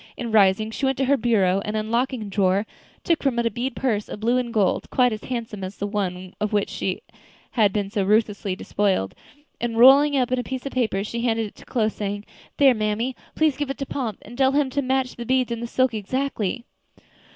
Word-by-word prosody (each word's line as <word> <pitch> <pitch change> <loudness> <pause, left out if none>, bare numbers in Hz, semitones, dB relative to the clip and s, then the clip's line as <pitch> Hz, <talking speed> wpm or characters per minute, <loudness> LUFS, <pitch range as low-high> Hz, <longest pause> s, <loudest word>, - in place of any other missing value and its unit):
And 235 -3 -4
rising, 210 +1 +4
she 270 +4 -1
went 265 - 0
to 270 - +1
her 280 +2 +4
bureau, 200 -6 +2
and 210 +1 -3
unlocking 235 +3 -1
a - - -7
drawer, 195 0 +1 0.4
took 335 -2 +1
from 270 -4 0
it 235 - +1
a 230 - +1
bead 245 +4 -3
purse 215 -6 -1
of - - -6
blue 235 +4 +2
and 240 -2 -3
gold, 205 -5 +1
quite 250 -2 +3
as 215 - -7
handsome 225 -5 -4
as 185 +2 -6
the 205 - -3
one 185 -3 -3
of 210 - 0
which 205 -2 +1
she 190 -1 -3 0.5
had 215 -4 +3
been 200 -1 -2
so 205 -3 0
ruthlessly 205 -1 +1
despoiled, 190 - 0 0.5
and 230 -1 -2
rolling 275 +4 +7
it 270 - +3
up 250 - -1
in 255 - +1
a - - -2
piece 260 0 -5
of 275 - -3
paper, 220 -6 0
she 230 +2 -4
handed 225 -2 +1
it 205 - -10
to - - -14
Chloe, 220 -4 +1
saying: 205 -1 -4 0.3
"There, 275 -2 +6
mammy, 220 +3 -1 0.2
please 310 -4 +2
give 290 -2 -2
it 275 - -3
to 275 - -3
Pomp, 240 -7 -3
and 235 - -11
tell 265 +1 +3
him 285 -2 +1
to 285 - 0
match 260 -1 -1
the 240 - -5
beads 255 0 +1
and 235 0 -3
the 235 - -3
silk 255 0 +1
exactly." 235 0 -2
230 Hz, 235 wpm, -23 LUFS, 205-255 Hz, 0.5 s, rolling